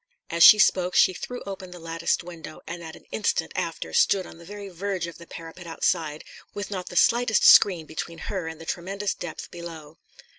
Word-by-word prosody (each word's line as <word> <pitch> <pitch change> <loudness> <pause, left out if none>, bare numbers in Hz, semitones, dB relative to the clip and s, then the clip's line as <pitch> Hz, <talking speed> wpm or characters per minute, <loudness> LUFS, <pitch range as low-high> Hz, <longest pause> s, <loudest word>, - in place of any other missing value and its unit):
As 170 - -2
she 210 - +11
spoke 185 -4 +3
she 185 - +5
threw 245 +7 -7
open 195 -2 -7
the 180 - -10
latticed 165 +1 -1
window, 165 -3 -10
and 170 +1 -7
in 160 -1 -9
an - - -16
instant 215 - -1
after - - -4
stood 200 - +3
on 165 - -13
the 170 - -13
very 205 +2 -8
verge 190 -1 -3
of 170 0 -9
the 170 - -13
parapet 165 +2 -10
outside, 160 -2 -1 0.3
with 205 0 -5
not 185 -2 -4
the - - -10
slightest 235 +2 +3
screen 175 -5 +7
between 160 +2 -6
her 180 0 -4
and 160 -1 -7
the 165 - -10
tremendous 195 +4 -3
depth 175 -3 -8
below. 165 -3 -10
175 Hz, 200 wpm, -25 LUFS, 165-195 Hz, 0.3 s, she